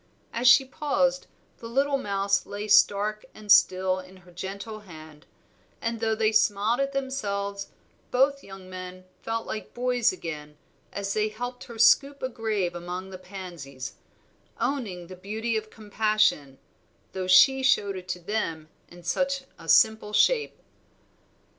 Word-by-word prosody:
As 240 +2 +1
she 265 +3 +8
paused, 270 -1 0 0.3
the 230 - -8
little 275 +3 +1
mouse 200 -3 0
lay 205 +1 -5
stark 210 0 +3
and 210 -1 -3
still 185 -2 +5
in 185 0 -13
her 180 - -16
gentle 200 +4 -6
hand; 155 -6 -13 0.5
and 230 0 -3
though 220 -1 0
they 220 0 +2
smiled 215 +2 +2
at 275 0 0
themselves, 200 -8 -3 0.4
both 275 +2 +2
young 195 -1 -11
men 185 0 -9 0.2
felt 225 0 -3
like 215 - -6
boys 245 -1 +2
again 150 -4 -7 0.3
as 200 0 -3
they 215 0 +1
helped 245 +3 -6
her 235 - -10
scoop 275 +4 +4
a 260 - -1
grave 215 -7 -2
among 180 +2 -6
the 185 - -8
pansies, 175 -9 -8 0.7
owning 210 -11 -2
the 185 +2 -10
beauty 220 +5 -3
of 215 0 -3
compassion, 215 -10 0 0.5
though 185 -1 -4
she 265 +9 +6
showed 200 -6 +2
it 185 -1 -8
to 180 -1 -3
them 165 -5 -3 0.2
in 175 0 -14
such 275 +10 -1 0.2
a 165 - -10
simple 220 +4 +4
shape. 455 - +2
210 Hz, 145 wpm, -26 LUFS, 185-235 Hz, 0.7 s, she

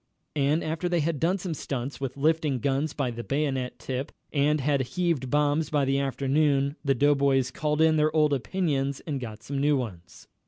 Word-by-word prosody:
And 145 +3 +2
after 160 +3 -2
they 175 -2 +1
had 155 -1 -1
done 175 +6 +2
some 180 -3 -4
stunts 135 -2 -5
with 135 0 -4
lifting 155 -1 +1
guns 140 +4 0
by 135 -4 -2
the 120 0 -6
bayonet 135 -3 -1
tip, 130 +1 -4 0.2
and 150 +1 +2
had 140 0 +1 0.2
heaved 165 -8 0
bombs 150 +2 +1
by 145 -2 +1
the 135 +1 +1
afternoon, 140 +1 +1
the 135 -2 +2
doughboys 140 -1 +3
called 150 +2 -1
in 160 -1 +5
their 155 0 +3
old 150 -2 +4
opinions 140 -2 -1
and 145 -4 -4
got 110 -3 -8
some 135 +4 -3
new 145 +1 +3
ones. 95 -8 -7
140 Hz, 190 wpm, -27 LUFS, 135-155 Hz, 0.2 s, in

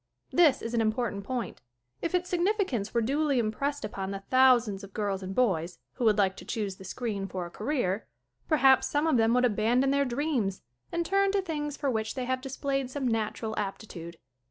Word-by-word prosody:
This 335 -5 +4
is 230 - -4
an 230 - +2
important 215 -2 -1
point. 245 - -4 0.4
If 335 +2 -1
its 360 0 -1
signif 370 +5 +2
icance 240 - -1
were 235 -1 +1
duly 280 +3 +1
impressed 245 +5 -1
upon 195 -2 -4
the 195 0 -5
thousands 245 -6 +4
of 195 0 -12
girls 200 -2 -1
and 190 0 -5
boys, 180 -8 +1 0.2
who 250 - -2
would 215 -1 +4
like 195 -2 +2
to - - -9
choose 200 -4 -3
the - - -11
screen 200 0 -3
for 185 -2 -4
a 175 - -9
career, 220 - -1 0.4
perhaps, 270 -4 +5
some 295 +2 0
of 315 -6 +3
them 225 +1 +3
would 250 0 +4
abandon 240 +4 +2
their 280 0 +3
dreams 250 -7 -1 0.3
and 340 0 -1
turn 395 +2 +2
to 400 - +2
things 295 -4 -3
for 280 -2 0
which 220 -2 -2
they 255 -2 -2
have 255 0 -1
displayed 275 0 -2
some 265 -1 -2
natural 220 -1 -1
aptitude. 175 -4 -6
240 Hz, 205 wpm, -29 LUFS, 205-280 Hz, 0.4 s, perhaps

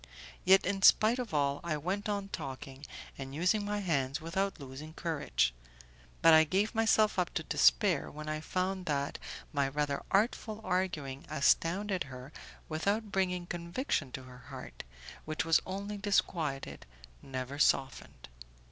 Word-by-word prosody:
Yet, 190 +1 +6
in 195 0 -1
spite 220 +4 +6
of 245 -3 -4
all, 140 -2 +1
I 165 -3 -1
went 190 +7 -2
on 200 -1 -2
talking 135 -3 -7 0.3
and 135 0 -6
using 185 +6 +2
my 205 0 -2
hands 140 -6 0
without 190 +4 -2
losing 140 +3 -9
courage, 145 - 0 0.7
but 165 - +8
I 160 0 +8
gave 195 +7 0
myself 220 -2 +3
up 180 - 0
to - - -1
despair - - +3
when 155 +1 -8
I 155 0 -2
found 185 +3 -2
that 140 -1 -1 0.3
my 140 -2 +2
rather 145 0 -1
artful 215 +1 +1
arguing 175 -8 -2
astounded 180 +6 +2
her 130 +1 -10 0.3
without 200 +7 -1
bringing 180 -3 0
conviction 170 - -2
to 130 - -6
her 125 -1 -12
heart, 65 - -9 0.4
which 155 +1 -2
was 165 -1 +4
only 200 +2 -4
disquieted, 165 -8 -1 0.3
never 130 +1 -5
softened. 135 -3 +1
165 Hz, 145 wpm, -32 LUFS, 140-195 Hz, 0.7 s, but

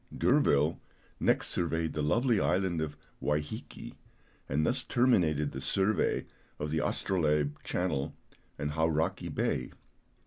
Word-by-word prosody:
D'Urville 80 - +3 0.4
next - - +2
surveyed 80 -2 -1
the 75 - -2
lovely 115 - +2
island 90 -3 +1
of 75 -1 -4 0.2
Wai 75 0 +1
hiki, 75 - -8 0.6
and 75 +3 +1
thus 125 +1 +1
terminated 85 - +2
the 65 - -6
survey 95 +9 +1 0.3
of 75 0 -3
the 80 - +1
Astrolabe 75 -5 +1
Channel 80 -6 -1 0.4
and 75 0 -2
Hauraki 80 0 0
Bay. - - -1
80 Hz, 125 wpm, -31 LUFS, 75-95 Hz, 0.6 s, D'Urville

